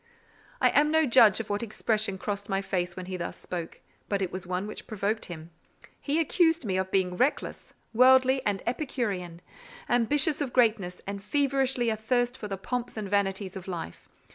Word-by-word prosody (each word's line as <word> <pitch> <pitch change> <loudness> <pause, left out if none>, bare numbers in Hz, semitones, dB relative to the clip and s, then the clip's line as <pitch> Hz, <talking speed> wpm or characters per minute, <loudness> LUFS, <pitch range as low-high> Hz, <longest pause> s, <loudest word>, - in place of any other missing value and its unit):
I - - +5
am 300 +1 +4
no 320 0 +3
judge 230 -6 +6
of 220 -2 -5
what 205 - -1
expression 215 -2 -1
crossed 200 +1 -4
my 195 0 0
face 180 -2 -2
when 185 - -6
he 185 0 -5
thus 170 - -5
spoke, 170 -2 -6 0.3
but 200 - 0
it 190 -2 -2
was 185 -1 -6
one 180 +2 -2
which 210 - -8
provoked 215 0 -2
him: 165 -1 -9 0.5
he 295 +3 0
accused 325 -2 +2
me 190 -3 -1
of 190 0 -1
being 185 -2 +1
reckless, 255 +8 -1 0.2
worldly, 260 +2 +5
and 200 -2 -1
epicurean; 210 - -3 0.4
ambitious 285 +6 +2
of 270 -4 -2
greatness, 220 -7 +2
and 200 0 -5
feverishly 265 0 +1
athirst 245 +3 0
for 215 - -6
the 195 -1 -4
pomps 245 +4 -4
and 205 -2 -4
vanities 195 -1 0
of 190 -1 -8
life. 170 - -7
210 Hz, 180 wpm, -28 LUFS, 190-255 Hz, 0.5 s, judge